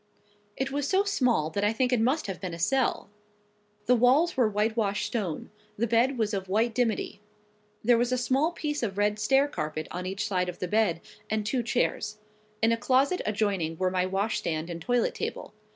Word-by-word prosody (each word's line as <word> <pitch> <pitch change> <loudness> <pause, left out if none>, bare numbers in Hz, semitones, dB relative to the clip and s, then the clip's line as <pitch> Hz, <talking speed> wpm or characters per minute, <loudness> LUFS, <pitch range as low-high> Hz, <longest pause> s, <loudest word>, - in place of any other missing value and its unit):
It 270 +1 -2
was 285 0 -1
so 385 +4 +3
small 250 - +1
that 200 +4 -2
I 205 - +3
think 250 +2 +1
it 240 - +2
must 265 +7 +1
have 195 -3 -5
been 180 -3 -4
a - - -10
cell. 205 +1 0 0.7
The 250 - +4
walls 260 +8 +4
were 245 -4 +3
whitewashed 210 -1 0
stone; 195 -10 -3 0.3
the 230 - +1
bed 235 +4 +2
was 220 -2 0
of 190 -1 -3
white 225 +4 +1
dimity. 225 -3 -1 0.6
There 235 +1 +4
was 240 +1 +1
a 255 - +2
small 270 +6 +1
piece 295 -3 -3
of 200 -5 -3
red 205 0 +1
staircarpet 215 - 0
on 180 +1 -4
each 195 +3 -3
side 180 -3 0
of 175 - -7
the 180 - -3
bed, 195 -4 +1 0.3
and 215 -1 -1
two 245 +4 0
chairs. 215 -1 -1 0.5
In 225 - +5
a 230 - +2
closet 270 +8 +2
adjoining 200 -6 -1
were 185 +1 0
my 185 0 +1
washstand 180 -4 -2
and 170 0 -6
toilet 245 +6 +1
table. - - -5
220 Hz, 195 wpm, -28 LUFS, 190-250 Hz, 0.7 s, In